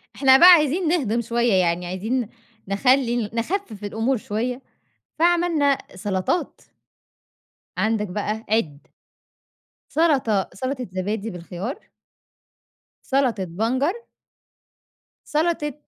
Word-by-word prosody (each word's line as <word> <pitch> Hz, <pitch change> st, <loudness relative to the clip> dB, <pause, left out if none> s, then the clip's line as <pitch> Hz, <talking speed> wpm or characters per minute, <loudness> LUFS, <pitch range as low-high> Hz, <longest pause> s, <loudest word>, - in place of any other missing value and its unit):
إحنا 265 Hz, -1 st, +6 dB
بقى 355 Hz, +6 st, +9 dB
عايزين 330 Hz, +1 st, +5 dB
نهضم 255 Hz, -9 st, +1 dB
شوية، 235 Hz, 0 st, 0 dB
يعني 180 Hz, -1 st, +1 dB
عايزين 220 Hz, +6 st, -2 dB, 0.4 s
نخلّي 240 Hz, +5 st, +2 dB
ال 220 Hz, -3 st, -2 dB
نخفف 230 Hz, -, -3 dB
الأمور 225 Hz, +6 st, -1 dB
شوية 240 Hz, +5 st, -3 dB, 0.6 s
فعملنا 335 Hz, -5 st, +2 dB, 0.2 s
سلطات 190 Hz, -, -2 dB, 1.2 s
عندك 215 Hz, -1 st, 0 dB
بقى 210 Hz, +4 st, -4 dB
عِد 160 Hz, -10 st, -1 dB, 1.0 s
سلطة 265 Hz, -, +1 dB
سلطة 255 Hz, +4 st, -4 dB
زبادي 200 Hz, +4 st, -3 dB
بالخيار 180 Hz, -, -7 dB, 1.2 s
سلطة 260 Hz, -8 st, +1 dB
بنجر 235 Hz, -, 0 dB, 1.4 s
سلطة 305 Hz, -2 st, 0 dB
235 Hz, 90 wpm, -22 LUFS, 205-280 Hz, 1.4 s, بقى